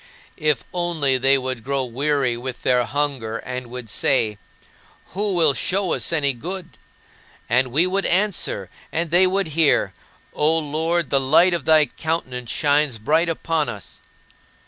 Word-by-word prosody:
If 150 -5 +1
only 160 -7 0
they 135 +2 +4
would 130 -3 -4
grow 140 0 -1
weary 135 0 0
with 125 +1 -7
their 125 -1 +2
hunger 130 -3 -2
and 125 +1 -6
would 125 -1 -8
say, 110 -1 +1 0.7
"Who 200 +1 -1
will 160 -4 +4
show 185 +4 0
us - - -1
any 145 -4 +1
good?" 175 +8 -8 0.7
And 125 +3 +2
we 145 +8 +2
would 195 +2 0
answer, 180 - -1 0.2
and 165 0 -2
they 180 +2 +5
would 190 -1 -1
hear, 145 - +2 0.4
"O 155 +2 +2
Lord, 160 +1 -1
the 140 - +4
light 155 +7 +4
of 170 -4 -2
thy 155 -1 +5
countenance 130 -7 -4
shines 145 -3 +1
bright 160 +10 +1
upon 165 -1 -1
us." 105 -4 -10
145 Hz, 150 wpm, -21 LUFS, 125-165 Hz, 0.7 s, they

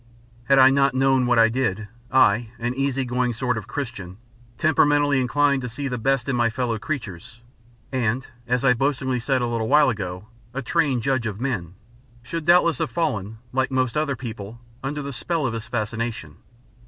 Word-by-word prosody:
Had 135 +2 +4
I 130 0 +8
not 135 -1 +2
known 130 -1 +3
what 120 -1 +3
I 115 0 +7
did, 110 -4 -1 0.2
I, 120 -3 +4
an 120 +1 -2
easy 135 0 -1
going 125 0 0
sort 125 +1 -1
of 110 - -6
Christian 110 -10 -6 0.4
temperamentally 145 -3 +3
inclined 140 +2 +2
to 125 - -4
see 140 +5 -4
the 125 -2 -3
best 135 +1 0
in 135 - 0
my 120 -1 +2
fellow 115 -2 -2
creatures, 115 - -6 0.5
and, 125 -1 0 0.2
as 125 +2 0
I 125 - +6
boastingly 130 0 0
said 130 +1 0
a - - 0
little 115 -2 -1
while 145 -1 +5
ago, 95 -2 -5 0.3
a 135 - -3
trained 135 -4 +1
judge 130 -3 0
of 105 -1 -5
men, 100 -10 -3 0.5
should 165 +5 -5
doubtless 170 -4 +4
have - - -1
fallen, 110 - -2 0.2
like 130 0 +1
most 130 -2 0
other 150 -2 0
people, 115 -3 -8 0.2
under 145 +2 -3
the 140 0 -5
spell 155 +6 -2
of 120 - -1
his 115 +1 -5
fascination. 110 - -4
125 Hz, 185 wpm, -23 LUFS, 115-135 Hz, 0.5 s, I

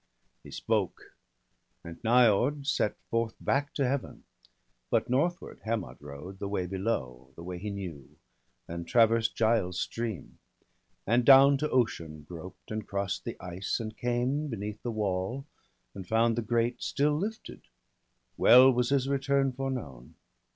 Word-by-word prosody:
He - - -13
spoke; - - -2 0.7
and 85 0 -10
Niord 125 +4 +3
set 125 -7 0
forth 115 -1 0
back 140 +2 0
to 140 -3 +1
Heaven. 135 0 -3 0.7
But - - +1
northward 170 +7 -1
Hermod 110 -3 -3
rode, 75 +7 -9
the 100 - -3
way 100 -2 -2
below, 85 - -3
The 85 - -10
way 90 0 -6
he 105 +3 -4
knew; 85 -9 -7 0.6
and 85 0 -6
traversed 115 0 +3
Giall's 110 -6 +1
stream. 115 -5 -4 0.7
And 120 +3 +3
down 135 +2 +8
to 150 +1 -1
Ocean 80 -11 -1
groped, 90 +4 -10
and 110 0 -4
cross'd 100 -1 -3
the - - -6
ice. 90 +5 -3
And 110 -1 -5
came 125 +5 -1
beneath 105 -4 -5
the 120 - -4
wall, 105 +4 -2 0.5
and 95 -2 -8
found 115 +2 +2
the 120 - -1
grate 120 +2 0
Still 145 +2 +1
lifted; 210 +8 -5 0.8
well 130 +2 +8
was 125 0 +1
his 135 -1 +1
return 140 0 +1
foreknown. 125 - -5
115 Hz, 145 wpm, -29 LUFS, 95-130 Hz, 0.8 s, down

